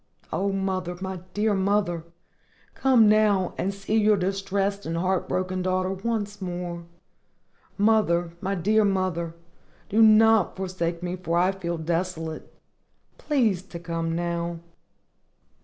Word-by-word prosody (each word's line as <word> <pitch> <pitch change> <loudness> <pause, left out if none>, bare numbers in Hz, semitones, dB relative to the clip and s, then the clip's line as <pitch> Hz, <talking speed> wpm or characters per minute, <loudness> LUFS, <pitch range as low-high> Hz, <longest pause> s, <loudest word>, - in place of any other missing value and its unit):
O, 200 +1 0
mother! 190 -2 -2
my 190 0 -4 0.2
dear 210 +1 +2
mother! 190 -3 0 0.7
come 250 -5 +4
now 210 -3 +3
and 195 - -1
see 200 +2 -2
your 210 0 +4
distressed 195 +1 -1
and 165 +1 -2
heart 185 +2 0
broken 185 0 -1
daughter 185 0 0
once 205 0 -3
more. 175 -2 -5 0.9
Mother! 195 -6 +2
my 195 +1 -1
dear 210 +5 +2
mother! 185 -4 -1 0.5
do 220 +3 +3
not 220 -3 +5
forsake 180 -2 -3
me, 180 +1 -3
for 170 -2 -1
I 180 +2 +3
feel 175 -3 -4
desolate! 165 -1 -3 0.7
Please 230 - +1
to 190 -2 -10
come 165 -1 -3
now. 170 0 -2
185 Hz, 125 wpm, -25 LUFS, 175-205 Hz, 0.9 s, not